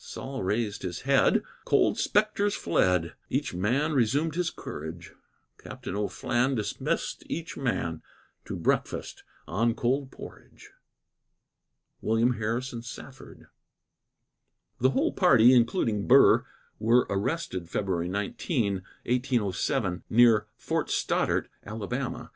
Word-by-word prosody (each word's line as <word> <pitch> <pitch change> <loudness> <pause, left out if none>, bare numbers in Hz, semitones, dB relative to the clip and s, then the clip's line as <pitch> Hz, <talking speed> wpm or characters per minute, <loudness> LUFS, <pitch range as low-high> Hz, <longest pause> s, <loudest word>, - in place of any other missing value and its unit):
Sol 135 0 -6
raised 105 +2 -1
his 90 -2 -5
head, - - +3 0.2
cold - - +3
spectres 205 -1 +1
fled; 85 0 +1 0.2
Each - - -1
man 125 - 0
resumed 145 +5 +1
his 175 0 0
courage; 80 +3 -8 0.5
Captain - - -7
O'Flan 120 +5 0
dismissed 105 -3 -2
each 165 -1 -4
man 85 -11 -2 0.4
To - - -5
breakfast - - -2 0.2
on 115 +8 +1
cold 130 +3 0
porridge. - - -13 1.3
WILLIAM 115 +3 +2
HARRISON 115 +2 -3
SAFFORD. 130 +2 -11 1.3
The 130 - +4
whole 135 0 +1
party, 125 - +6
including 115 -3 +2
Burr, 135 +3 +6 0.3
were 115 +3 +4
arrested 100 - -2
February 90 -3 -1
19, 100 - -1 0.3
1807 110 -7 0
near 115 -2 +5
Fort - - -2
Stoddart, - - 0 0.2
Ala. 115 +5 -4
115 Hz, 105 wpm, -27 LUFS, 100-130 Hz, 1.3 s, party